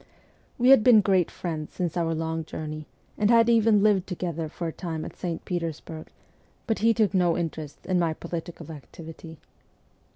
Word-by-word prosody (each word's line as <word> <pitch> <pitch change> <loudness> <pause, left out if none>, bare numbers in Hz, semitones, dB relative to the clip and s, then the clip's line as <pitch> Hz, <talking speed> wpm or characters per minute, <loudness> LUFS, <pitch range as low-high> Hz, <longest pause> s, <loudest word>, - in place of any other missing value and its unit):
We 250 +1 +3
had 270 -5 +8
been 230 -3 +7
great 190 -4 +2
friends 160 -4 -5
since 175 -3 -2
our 165 -2 0
long 160 0 -2
journey, 155 -1 -6 0.3
and 210 0 +3
had 230 0 +5
even 225 -3 +4
lived 200 -3 +3
together 170 -3 -3
for 170 - -6
a 160 - -4
time 165 -3 -5
at - - -9
St. 170 -2 -5
Petersburg, 165 -2 -5 0.6
but 225 -3 -1
he 230 +2 +4
took 215 -4 +2
no 180 -3 +2
interest 160 -3 -5
in 185 -1 +1
my 165 -2 0
political 170 0 -7
activity. 160 +3 -11
170 Hz, 170 wpm, -26 LUFS, 160-205 Hz, 0.6 s, had